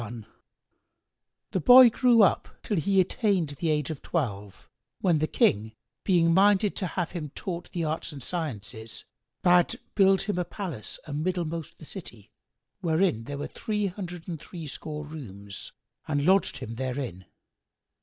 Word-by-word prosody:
[FN#95] 115 -1 -7 1.3
The 190 - 0
boy 245 +6 +9
grew 235 -2 +5
up 195 - +2
till 210 - -1
he 195 +4 +2
attained 190 - +1
the 145 +3 -2
age 150 -1 0
of 150 - -7
twelve,[FN#96] 105 - -3 0.3
when 170 -5 +3
the 155 - +1
King 110 -4 +1 0.3
being 170 -3 +3
minded 200 +2 +4
to 185 - -1
have 175 -1 -3
him 160 -5 -5
taught 175 -2 -5
the 175 -3 -2
arts 160 +1 -2
and 140 -4 -7
sciences, 115 - -5 0.4
bade 175 -1 +4
build 195 -1 +4
him 195 -3 -2
a - - +1
palace 175 - -5
amiddlemost 165 +1 -3
the 155 - -12
city, 120 - -10 0.5
wherein 165 - +1
were 145 +2 -4
three 210 -2 -2
hundred 180 -3 -6
and 165 -4 -5
threescore 155 -2 -7
rooms,[FN#97] 100 -10 -9 0.4
and 145 -1 +1
lodged 190 +2 +3
him 115 - -6
therein. 125 -8 -4
165 Hz, 145 wpm, -27 LUFS, 140-185 Hz, 1.3 s, boy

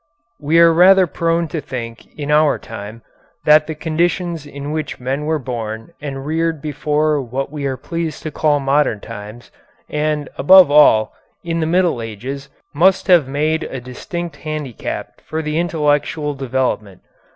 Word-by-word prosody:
We 155 +3 +1
are 170 0 +7
rather 185 +3 +6
prone 165 +1 0
to 155 +1 -3
think 115 -4 -7
in 145 -1 -3
our 150 0 +4
time 110 +1 -9 0.4
that 150 0 +6
the 160 - -4
conditions 165 0 -1
in 140 0 -6
which 155 -1 -4
men 135 +4 -3
were 160 +1 +1
born 115 -4 -6
and 135 -2 -6
reared 160 +1 -1
before 150 +1 0
what 135 +3 -4
we 145 -2 -3
are 130 -1 -3
pleased 165 -1 -4
to 155 - -4
call 150 0 +1
modern 135 -5 +1
times, 110 +2 -10 0.4
and, 150 -1 -1
above 185 +1 +7
all, 145 -7 +5 0.3
in 165 -1 -2
the 160 - 0
Middle 175 -7 +1
Ages, 130 +6 -6 0.2
must 185 +6 +3
have 170 -7 +6
made 155 +4 0
a 130 - -6
distinct 145 +6 -6
handicap 150 -5 -6
for 160 0 -4
their 150 0 -3
intellectual 150 -2 0
development. 125 -7 -2
150 Hz, 155 wpm, -18 LUFS, 130-160 Hz, 0.4 s, are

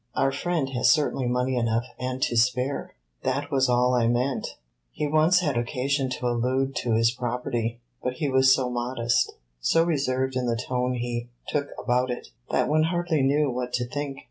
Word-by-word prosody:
"Our 135 - +2
friend 160 0 -1
has 125 -2 +2
certainly 145 -5 +2
money 125 +1 0
enough 115 0 +1
and 130 0 -3
to 120 - 0
spare." 125 +4 0 0.3
"That 140 +3 -2
was 130 -2 +2
all 125 +1 +3
I 120 -2 +3
meant. 125 +3 -1 0.3
He 150 - -3
once 155 +4 +4
had 145 -6 0
occasion 130 +3 0
to 125 0 -4
allude 130 +3 0
to 120 - 0
his 115 +1 +4
property, 120 -1 -3 0.2
but 125 - -2
he 145 +3 -2
was 130 0 +5
so 130 -1 +2
modest, 120 +1 0 0.3
so - - +3
reserved 130 -5 0
in 125 -1 0
the 115 -1 0
tone 125 +1 -1
he 120 0 -3 0.2
took 145 -1 -1
about 125 +1 +1
it, 125 - -5 0.2
that - - +1
one 155 +1 +3
hardly 175 -2 0
knew 140 +1 +2
what 125 0 -4
to 125 - 0
think." 145 +1 -4
130 Hz, 185 wpm, -26 LUFS, 120-140 Hz, 0.3 s, was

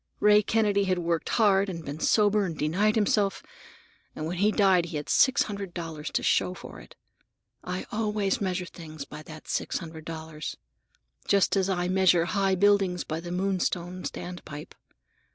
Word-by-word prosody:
Ray 210 0 +6
Kennedy 205 -2 +2
had 185 -1 +1
worked 170 -2 -1
hard 200 -3 +3
and 165 -3 -6
been 145 +2 -6
sober 210 +2 +3
and 165 -5 -4
denied 190 +9 +1
himself, 205 -2 +1 0.7
and 155 - -4
when 175 +3 -3
he 210 +2 +4
died 190 -5 +4
he 165 - -4
had 145 - -6
six 265 - +4
hundred 200 -3 -6
dollars 165 -3 -5
to - - 0
show 180 - +2
for - - -10
it. - - -15 0.7
I 180 +1 -4
always 210 -3 0
measure 185 -2 -1
things 155 -5 -9
by 150 +2 -9
that 155 0 -12
six - - -1
hundred 160 -2 -8
dollars, 160 -2 -6 0.7
just 200 0 +3
as 195 -1 +1
I 180 -2 0
measure 180 -2 +4
high 195 +1 +1
buildings 195 -2 +3
by 160 +1 -4
the 175 +1 -7
Moonstone 185 -1 -1
standpipe. 170 -6 -7
185 Hz, 170 wpm, -27 LUFS, 165-200 Hz, 0.7 s, Ray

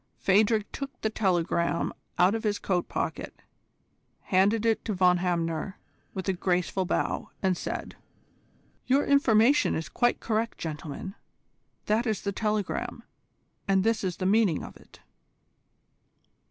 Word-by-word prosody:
Phadrig 210 +2 +3
took 275 -2 -7
the 220 - 0
telegram 170 -4 0 0.2
out 180 +3 +5
of 225 - -2
his 210 -2 0
coat 180 -3 -1
pocket, - - -4 0.8
handed 205 +4 +2
it 225 -1 +2
to 215 - -2
Von 180 -1 +4
Hamner 175 +1 -2 0.4
with 190 0 -4
a 190 - +2
graceful 180 +1 0
bow, - - -1
and 190 -1 +2
said: - - -5 0.9
"Your 270 +3 +3
information 275 -1 +4
is 160 - -4
quite 240 0 +1
correct, 225 +1 -1
gentlemen. 155 +3 -6 0.7
That 225 +4 +1
is 215 -2 -1
the 200 - -2
telegram, 210 -1 -2 0.6
and 195 -1 +3
this 225 -1 +1
is 185 -3 -2
the 185 - -3
meaning 200 -4 +3
of - - -9
it." - - -18
195 Hz, 135 wpm, -27 LUFS, 180-220 Hz, 0.9 s, out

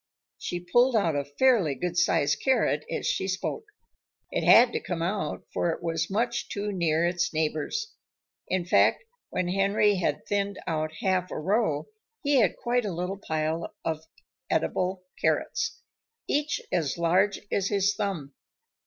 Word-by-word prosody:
She 175 - -3
pulled 240 +8 +3
out 170 -8 +2
a 145 - 0
fairly 170 - +2
good 175 +5 -3
sized 175 -4 +2
carrot 215 - +2
as - - -3
she 190 - 0
spoke. 190 - -3 0.7
It - - -1
had 240 +1 +7
to - - 0
come 170 -2 -3
out, 185 -3 -2
for 175 - +1
it 165 - -3
was 165 -1 -1
much 235 +4 -1
too 205 +1 -3
near 170 -3 +1
its 175 0 0
neighbors. 160 - -1 0.5
In 185 -2 0
fact, 180 - +3 0.3
when 180 -1 -1
Henry 200 +2 +3
had 180 - -1
thinned 200 0 -1
out 155 -1 -1
half 185 -1 +1
a - - -5
row 180 -2 +1 0.4
he 285 -1 +3
had 215 -8 +3
quite 245 +1 0
a 205 - -2
little 180 +3 -3
pile 160 +1 -2
of 160 -1 -2 0.5
eatable 185 0 0 0.2
carrots, 475 - 0 0.5
each 295 +2 0
as 165 -6 0
large 180 +4 +2
as 195 -1 +1
his 200 0 +2
thumb. 190 -11 -3
185 Hz, 155 wpm, -27 LUFS, 165-205 Hz, 0.7 s, had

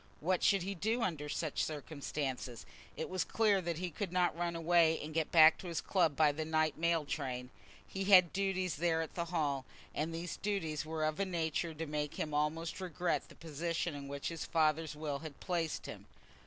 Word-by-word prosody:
What 180 +3 +1
should 195 -3 +4
he 195 +2 -2
do 220 +6 0
under 150 -5 -2
such 155 0 -1
circumstances? 140 -5 -4 0.3
It 160 - -3
was 185 -2 -1
clear 210 -4 +2
that 170 -2 -2
he 180 0 -3
could 190 +3 -4
not 180 -2 +2
run 170 0 -2
away 165 -1 +4
and 155 +1 -6
get 160 -1 0
back 160 -1 +8
to 185 - -7
his 170 -2 -2
club 170 -7 +2
by 155 -1 +5
the 155 +2 -3
night 155 0 +1
mail 170 -1 +1
train. 130 -4 -4 0.4
He 195 0 -3
had 185 -4 +7
duties 190 -3 0
there 165 0 +1
at 160 - -8
the 170 - -2
Hall, 150 -6 -1 0.3
and 155 +3 -1
these 170 +1 -4
duties 165 -7 -2
were 160 -1 -1
of 155 +2 -1
a 200 - +2
nature 165 -2 -1
to 165 +2 -4
make 150 -1 -3
him 150 - -3
almost 160 +4 -1
regret 180 -1 -1
the - - -14
position 165 +1 -2
in 140 -1 -7
which 140 0 -3
his 165 -2 -5
father's 155 -1 +1
will 150 -2 -3
had 155 -2 -9
placed 170 -3 -2
him. - - -8
160 Hz, 205 wpm, -34 LUFS, 150-175 Hz, 0.4 s, back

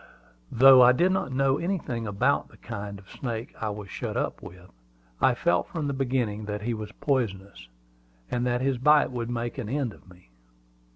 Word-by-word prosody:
Though 130 +1 +8
I 125 0 +7
did 175 +8 +2
not 185 -7 -1
know 135 +1 +1
anything 165 - -3
about 100 -1 +1
the - - -19
kind 100 0 -7
of 95 -1 -16
snake 115 0 -5
I 110 - -1
was 105 -1 -7
shut - - -4
up - - -2
with, 90 0 -12 0.5
I 130 - +4
felt 170 +7 +1
from 165 -6 -4
the 140 - -1
beginning 125 -6 -1
that 105 0 -4
he 120 +1 -1
was 110 -1 -6
poisonous, 100 - -2 0.6
and 120 0 -1
that 125 0 0
his 130 -2 0
bite 150 +2 +4
would 120 -2 -4
make 120 0 -3
an 105 - -5
end 135 -4 -1
of 95 - -19
me. 90 -8 -19
120 Hz, 190 wpm, -26 LUFS, 105-135 Hz, 0.6 s, Though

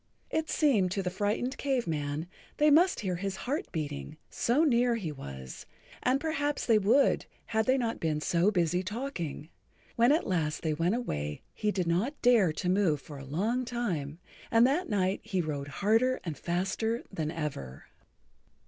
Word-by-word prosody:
It 320 0 -1
seemed 230 - +3
to 195 - -1
the 180 - -2
frightened 210 +8 -1
Cave 265 -4 0
Man 150 -1 -2 0.3
they 300 0 +5
must 345 +2 +5
hear 185 -4 -2
his 195 +1 -3
heart 295 +10 -2
beating, 145 - -4
so 255 +7 +2
near 245 -5 +3
he 185 -9 -3
was, 65 - -9 0.3
and 255 +2 +2
perhaps 295 -2 -1
they 225 -3 +5
would 220 +8 +3 0.2
had 220 0 0
they 260 +1 +4
not 235 -3 -1
been 155 -2 0
so 170 +5 +2
busy 180 -3 +1
talking. 185 - -5 0.5
When 235 +3 +5
at 310 - +2
last 160 -4 -1
they 160 -2 +1
went 170 +7 +1
away 75 - -3
he 210 - -1
did 185 -3 -1
not 195 - 0
dare 230 -9 +5
to 155 +4 -4
move 180 -5 +2
for 145 -1 -10
a - - -8
long 210 - 0
time, 180 - -3 0.3
and 230 +1 +5
that 295 +8 +1
night 190 -2 +1
he 210 -4 -2
rowed 145 -4 -2
harder 225 - +2
and 165 -4 -4
faster 195 - -1
than 160 -6 -2
ever. 140 - -5
195 Hz, 175 wpm, -30 LUFS, 160-245 Hz, 0.5 s, they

